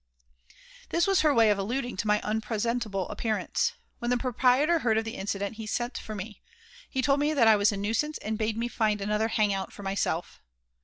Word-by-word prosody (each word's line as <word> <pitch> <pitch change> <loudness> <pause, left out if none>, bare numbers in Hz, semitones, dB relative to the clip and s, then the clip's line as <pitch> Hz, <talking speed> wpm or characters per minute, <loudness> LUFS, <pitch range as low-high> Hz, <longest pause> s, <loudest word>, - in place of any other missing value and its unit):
This 340 +1 +2
was 390 -1 +3
her 305 -1 +4
way 230 -5 +5
of 200 - 0
alluding 245 +5 -2
to 210 - -2
my 210 0 +3
unpresentable 215 -2 -2
appearance. 220 -2 -1 0.3
When 240 - -2
the 245 - +3
proprietor 260 +6 +2
heard 225 -6 +1
of 220 - 0
the 225 - -5
incident 200 +1 -3
he 220 -1 -6
sent 240 +3 -2
for 215 - -7
me. 210 +2 -7 0.5
He 260 -1 -1
told 275 +1 +3
me 300 +2 +1
that 235 -5 +5
I 220 - +7
was 205 +1 +3
a 200 - -4
nuisance 225 +10 -1
and 220 +1 -3
bade 220 0 -1
me 235 +1 -1
find 215 -3 0
another 210 +2 0
"hang 215 -2 +1
out" 195 -1 -3
for 205 - -11
myself. 195 -3 -2
220 Hz, 210 wpm, -28 LUFS, 210-245 Hz, 0.5 s, I